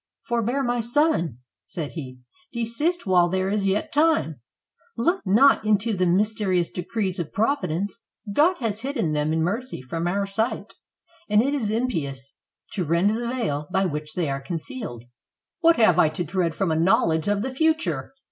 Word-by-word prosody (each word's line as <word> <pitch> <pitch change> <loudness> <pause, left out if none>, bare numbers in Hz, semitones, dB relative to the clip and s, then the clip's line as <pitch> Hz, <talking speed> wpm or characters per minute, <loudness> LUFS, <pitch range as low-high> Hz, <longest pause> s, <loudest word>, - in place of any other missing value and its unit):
"Forbear, 240 +2 -1
my 240 -1 0
son," 235 - +1 0.2
said 155 -5 -6
he; 130 -6 -7 0.3
"desist 250 +9 -1
while 180 -2 +4
there 190 +1 0
is 205 -1 0
yet 195 +2 0
time. 290 - +2 0.6
Look 345 +11 +1
not 220 +5 +5
into 215 +1 +1
the 185 -1 +1
mys 205 +5 +2
terious 185 -5 0
decrees 190 +1 -3
of 165 -3 -4
Providence. 205 - -1 0.3
God 330 - +4
has 225 -3 -2
hidden 255 - -1
them 150 0 0
in 160 0 +1
mercy 230 +9 -2
from 165 +7 -4
our 200 +3 0
sight, 220 +5 -2 0.6
and 210 0 +4
it 275 +2 0
is 245 -8 -1
impious 150 - -3 0.4
to 190 - -2
rend 170 +5 +2
the 235 +2 -2
veil 150 - -2
by 190 +1 +2
which 150 -2 -4
they 175 -3 0
are 135 0 -3
concealed." 165 - -6 0.6
"WTiat 335 0 +6
have 180 -7 +4
I 160 - +5
to 155 +3 -3
dread 170 -1 -1
from 190 -4 0
a - - +1
knowledge 165 -2 +2
of 205 0 +1
the 260 +1 -3
fu 320 +3 +3
ture?" 320 -4 -4
200 Hz, 175 wpm, -24 LUFS, 165-240 Hz, 0.6 s, WTiat